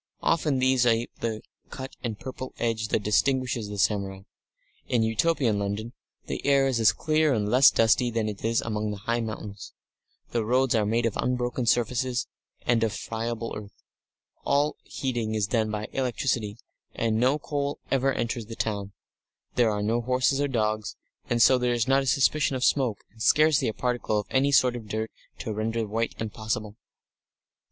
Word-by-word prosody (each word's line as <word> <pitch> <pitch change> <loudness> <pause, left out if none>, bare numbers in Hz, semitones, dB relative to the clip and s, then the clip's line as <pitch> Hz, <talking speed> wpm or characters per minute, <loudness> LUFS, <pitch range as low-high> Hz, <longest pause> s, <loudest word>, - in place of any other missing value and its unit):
Often 150 -4 +2
these 130 -1 +3
ape 115 0 +1
the 110 -2 -3 0.3
cut 130 0 -8
and 110 -4 -3
purple 130 0 -7
edge 115 -2 -1
that 105 - 0
distinguishes 120 0 +1
the 105 - -6
samurai. 95 -1 0 0.7
In 120 -2 +2
Utopian 115 -1 +1
London 100 +4 -3 0.3
the - - -5
air 140 -1 +4
is 130 -3 +1
as 115 -1 +6
clear 155 -3 +1
and 105 -2 0
less 125 +5 +7
dusty 115 +2 +3
than 115 -2 -1
it 105 -2 -6
is 115 0 +1
among 105 -2 -2
high 115 +4 -2
mountains; 105 -2 -7 0.6
the 115 -2 0
roads 130 +3 +2
are 110 -3 +2
made 115 +2 +1
of 115 - 0
unbroken 125 -1 -1
surfaces, 125 +1 +1 0.4
and 120 -2 +2
not 115 - +3
of 105 - -5
friable 115 0 -4
earth; 105 -1 -9 0.7
all 145 +2 +2
heating 120 -5 -2
is 105 -2 +1
done 110 +1 0
by 105 0 -3
electricity, 120 -4 -1 0.4
and 110 -1 0
no 130 +4 +3
coal 145 -1 -3
ever 135 0 +2
enters 115 -3 -3
the 115 - -7
town; 100 -3 -3 0.6
there 120 -2 +3
are 105 -1 -1
no 115 +3 +1
horses 130 +3 +1
or 145 - +2
dogs, 110 -4 -1 0.3
and 120 -1 +4
so 130 +1 +6
there 125 0 +1
is 120 -1 0
not 135 +1 +4
a 135 - -4
suspicion 140 +2 +2
of 125 - -2
smoke 125 -8 +2
and 110 +1 -16
scarcely 155 +4 +4
a - - +1
particle 120 -2 -1
of 105 - -4
any 135 +2 +3
sort 125 -3 +4
of 115 -3 -7
dirt 110 +2 -3 0.3
to 110 - -4
render 110 +2 -1
white 115 +2 -2
impossible. 110 -1 -4
115 Hz, 180 wpm, -26 LUFS, 110-130 Hz, 0.7 s, less